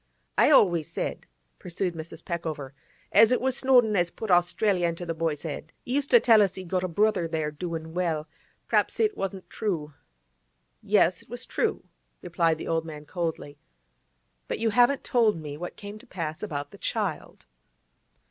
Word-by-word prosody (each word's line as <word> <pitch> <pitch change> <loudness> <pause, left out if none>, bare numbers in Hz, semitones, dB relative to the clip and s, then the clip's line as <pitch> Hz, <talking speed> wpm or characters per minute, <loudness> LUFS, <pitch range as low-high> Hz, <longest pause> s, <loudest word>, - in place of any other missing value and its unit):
'I - - +6
always 170 -6 +4
said,' - - -4 0.3
pursued 180 +1 -3
Mrs. 160 0 -8
Peckover, 155 -6 -4 0.4
'as 225 - +6
it 250 - +3
was 260 0 0
Snowdon 250 -6 +4
as 175 -2 +2
put 215 +3 -5
Australia 175 +1 +3
into 170 +1 -4
the 165 - -2
boy's 160 -2 -2
'ed. 155 +1 -6
He 245 - -3
used 280 0 0
to 475 - +7
tell 225 - +6
us 195 -2 +2
he'd 185 -2 -8
got 185 0 0
a - - 0
brother 190 0 +1
there, 160 -2 -2
doin' 160 0 -5
well. 165 -4 -1 0.4
P'r'aps - - +1
it 430 -2 +2
wasn't 195 -1 -4
true.' 165 -9 -3 0.9
'Yes, - - +3
it - - -22
was - - -6
true,' - - -1 0.4
replied 165 -2 +1
the - - -7
old 165 -1 0
man 150 -2 -9
coldly. 160 -3 -4 0.9
'But - - -2
you 225 -1 0
haven't 245 +5 +4
told 225 -7 +2
me 150 -2 -6
what 175 +4 -7
came 205 +1 -9
to - - -18
pass 160 -4 -5
about 145 -8 -4
the - - -14
child. - - -3
175 Hz, 175 wpm, -27 LUFS, 160-210 Hz, 0.9 s, to